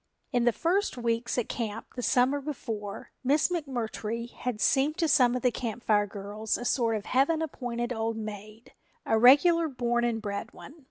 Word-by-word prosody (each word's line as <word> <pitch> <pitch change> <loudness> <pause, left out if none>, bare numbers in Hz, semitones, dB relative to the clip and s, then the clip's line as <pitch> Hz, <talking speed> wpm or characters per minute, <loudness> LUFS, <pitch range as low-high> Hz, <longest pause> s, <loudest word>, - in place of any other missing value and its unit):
In 245 -3 +1
the 240 - +5
first 355 - 0
weeks 235 0 -1
at 245 - 0
camp 225 -2 -5
the 250 - -4
summer 260 +3 +2
before, 225 -8 -6
Miss 280 +6 +3
McMurtry 235 -7 -3
had 250 -4 -4
seemed 285 +6 +2
to 330 - +1
some 250 -4 +4
of 250 - -3
the 250 - +4
Camp 235 0 -5
Fire 205 -1 +3
girls 205 +2 -3
a 245 - -6
sort 235 -3 +1
of 210 -1 -4
heaven 275 +5 +2
appointed 245 -6 -3
old 225 0 -2
maid, 215 +1 -8 0.3
a 220 - +2
regular 320 +7 +6
born 240 -3 -1
and 235 -2 0
bred 205 +1 -5
one. 285 - -12
240 Hz, 180 wpm, -28 LUFS, 220-270 Hz, 0.3 s, regular